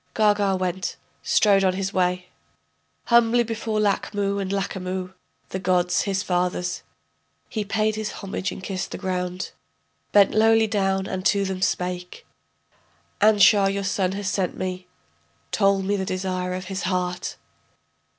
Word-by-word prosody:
Gaga 205 -2 +3
went, 185 0 -2 0.3
strode 200 -2 +4
on 185 -1 +3
his 195 +1 -3
way, 180 0 0 0.8
Humbly 235 0 +4
before 225 -1 -2
Lachmu 200 -1 0
and 195 -1 -3
Lachamu, 190 -2 -3 0.4
the 190 - -4
gods, 180 -1 +2
his 195 -1 -1
fathers, 180 0 -1 0.7
He 215 - -2
paid 215 +1 0
his 215 0 -3
homage 195 -1 -4
and 190 - -8
kissed 190 -1 -3
the - - -6
ground, 180 0 -3 0.6
Bent 200 -1 +6
lowly 225 +1 +5
down 195 -2 0
and 190 -1 -4
to 200 -1 +2
them 190 -1 -4
spake: 180 -1 -2 1.0
Anshar, 205 -1 +6
your 200 0 -2
son, 190 -1 0
has 200 0 -4
sent 190 -2 -1
me, 185 -1 -4 0.6
Told 195 -2 +2
me 205 +1 +1
the 190 - -1
desire 185 -1 -2
of 185 0 -5
his 190 0 -4
heart. 180 0 -2
195 Hz, 140 wpm, -24 LUFS, 185-205 Hz, 1.0 s, Bent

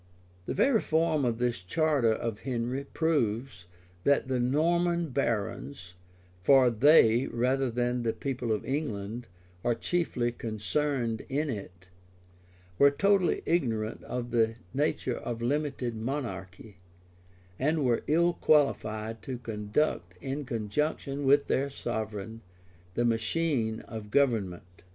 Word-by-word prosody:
The - - -2
very 260 -6 +3
form 160 -3 +1
of 115 -2 0
this 120 -6 -1
charter 140 - +2
of 110 -1 -2
Henry 125 +2 -3
proves, 120 - -1 0.4
that 140 -1 +2
the 130 -1 +1
Norman 170 +6 +1
barons 115 -5 -2 0.5
(for 130 +3 +6
they, 120 -1 +5
rather 130 +2 +1
than 120 +1 0
the 115 -1 +1
people 125 -2 -3
of 105 - -1
England, 120 -5 -3 0.4
are 120 - +2
chiefly 125 -4 -1
concerned 115 +1 -1
in 145 +2 0
it,) 95 -4 -8 0.9
were 140 - +8
totally 195 +4 +2
ignorant 115 -10 0
of 120 -1 -4
the 115 -1 +2 0.2
nature 135 -3 0
of 115 -1 -4
limited 135 -1 -1
monarchy, 110 -6 -5 0.8
and 150 +1 +1
were 120 -2 +2
ill 170 +3 +3
qualified 110 -9 +1
to 130 -2 -5
conduct, 105 - -2
in 135 +4 -4
conjunction 135 +5 -2
with 140 +1 +5
their 140 +2 0
sovereign, 110 -3 -5 0.5
the 120 - +1
machine 115 0 0
of 110 -2 -8
government. 100 -9 0
125 Hz, 120 wpm, -29 LUFS, 110-145 Hz, 0.9 s, were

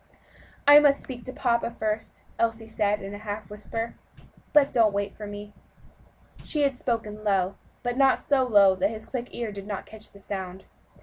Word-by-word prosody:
"I 290 0 +11
must 290 -2 +4
speak 245 -3 -8
to 255 - -5
papa 235 -2 0
first," 220 -2 -4 0.2
Elsie 225 -1 0
said 210 -2 0
in 195 +1 -6
a 205 - -7
half 210 0 -6
whisper, 225 +2 -4 0.6
"but 290 -2 +4
don't 225 -4 +4
wait 200 0 -2
for 210 - -7
me." 205 0 -8 0.9
She 300 -2 -1
had 275 -2 +2
spoken 220 -4 -3
low, 195 -2 +1 0.3
but 245 0 -2
not 270 -1 +5
so 275 -2 +2
low 205 -6 +6
that 190 +2 +2
his 220 0 -7
quick 245 -2 -4
ear 235 -3 -4
did 200 0 -8
not 205 -2 -4
catch 220 0 -11
the - - -16
sound. 190 -2 -6
215 Hz, 185 wpm, -26 LUFS, 205-245 Hz, 0.9 s, I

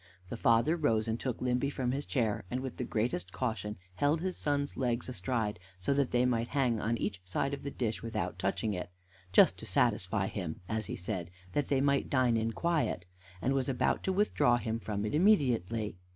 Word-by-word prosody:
The - - -4
father 120 +6 +3
rose, 115 -9 +1
and 115 +1 -1
took 125 -2 -3
Limby 125 +2 +1
from 130 -3 -1
his 140 +2 -3
chair, 115 -6 0
and, 125 +4 -2
with 130 -2 -5
the - - -2
greatest 120 +10 -1
caution, 110 -4 -2 0.2
held 145 +3 +2
his 185 +2 -2
son's 145 -1 -1
legs 120 -2 -1
astride, 115 -3 -2 0.2
so 90 +10 +1
that 140 -2 +2
they 125 0 +3
might 120 -2 +1
hang 125 -5 +1
on 115 +2 0
each 100 -3 -3
side 115 +10 -1
of 140 - -4
the 140 - -4
dish 115 -5 -2
without 115 -2 -3
touching 110 -2 0
it 90 -2 -4 0.4
"just - - +6
to - - -8
satisfy 95 +2 +2
him," 90 -5 -4
as 110 -2 -2
he - - -3
said, 90 -2 -4 0.2
"that 145 - 0
they 135 -2 +2
might 140 0 +2
dine 125 -3 +3
in 115 0 +1
quiet 160 - 0 0.2
" 90 0 -21
and 135 - +2
was 135 -1 0
about 130 - +1
to 190 - +2
withdraw 185 -11 +3
him 115 -1 -2
from 105 -2 -3
it 105 - -2
immediately. 120 - +2
120 Hz, 210 wpm, -32 LUFS, 110-140 Hz, 0.4 s, just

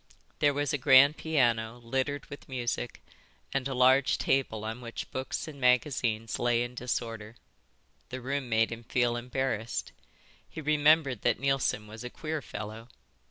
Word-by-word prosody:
There 145 -1 +3
was 145 -1 0
a 145 - 0
grand 140 +2 +7
piano 120 -7 +1
littered 130 +4 -2
with 145 - -11
music, 120 -2 -3 0.5
and 135 -1 0
a 135 - -3
large 130 +2 +4
table 110 -5 0
on 110 +3 -5
which 115 -1 -7
books 130 +4 -4
and 145 -3 -9
magazines 120 -3 +1
lay 120 0 +2
in 120 0 -6
disorder. 115 -3 -4 0.7
The 130 - -5
room 135 0 -3
made 115 0 +2
him 115 0 -6
feel 120 0 +1
embarrassed. 120 -2 -2 0.6
He - - -8
remembered 150 -4 +3
that 120 -2 +1
Neilson 135 -5 0
was 110 +2 -10
a 125 - -5
queer 155 +3 -4
fellow. 110 -1 -7
125 Hz, 155 wpm, -29 LUFS, 115-140 Hz, 0.7 s, grand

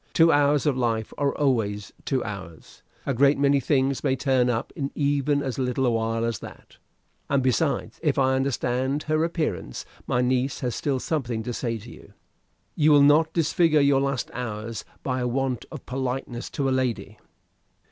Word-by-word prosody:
Two 165 0 +5
hours 145 0 +3
of 145 -3 +2
life 115 -3 -1
are 140 -1 0
always 110 -8 0
two 130 -2 0
hours. 95 -6 -9 0.2
A 135 - 0
great 140 +3 +4
many 140 0 +3
things 135 0 +1
may 130 - +2
turn 130 -2 +2
up 115 -2 -2
in 140 -4 -2
even 145 0 +1
as 130 -1 -3
little 130 +1 0
a 120 - +3
while 115 0 0
as 115 -1 -2
that. - - -12 0.5
And, 140 -2 +2
besides, 130 +1 0
if 150 -4 +1
I 130 -1 +3
understand 130 +1 0
her 155 +1 +1
appearance, 155 - -3 0.2
my 120 - +1
niece 130 +2 0
has 125 -2 -1
still 135 +1 -1
something 125 -7 -2
to 120 - -4
say 115 -1 -2
to 115 +3 -11
you. - - -15 0.6
You 150 0 +4
will 145 -1 +7
not 155 +3 +5
disfigure 165 -1 +3
your 140 -1 +4
last 135 -2 -2
hours 115 -2 -5 0.2
by 130 -1 -1
a 125 - 0
want 130 0 -1
of - - -9
politeness 125 -1 -4
to 140 - -2
a - - +1
lady?" 130 -3 -2
130 Hz, 180 wpm, -25 LUFS, 120-140 Hz, 0.6 s, will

